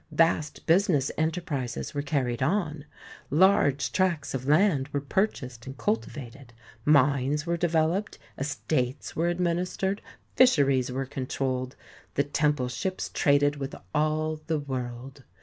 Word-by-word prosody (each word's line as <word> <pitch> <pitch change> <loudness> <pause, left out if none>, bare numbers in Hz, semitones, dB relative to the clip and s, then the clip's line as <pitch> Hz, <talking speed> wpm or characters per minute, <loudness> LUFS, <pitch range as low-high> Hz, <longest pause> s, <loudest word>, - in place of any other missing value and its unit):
Vast 155 -1 +1
business 165 - +3
enterprises 155 -6 -2
were 145 - -1
carried 135 -5 -1
on; 155 -1 0 0.4
large 145 -4 +3
tracts 175 -6 0
of 130 0 -4
land 150 -3 +3
were 145 -1 -2
purchased 135 - -2
and 135 - -7
cultivated; 135 - -4 0.3
mines 145 +1 +3
were 170 0 0
developed; 170 +3 0 0.2
estates 135 -1 -2
were 165 +2 +1
administered; 180 +3 -1 0.3
fisheries 140 - +4
were 135 +1 -2
controlled; 130 -1 -3 0.4
the 140 - +3
temple 145 -2 +1
ships 185 +9 -3
traded 145 0 +3
with 135 -1 -5 0.2
all 155 +1 0
the 160 -1 +1
world. 130 -1 -6
145 Hz, 120 wpm, -27 LUFS, 135-165 Hz, 0.4 s, fisheries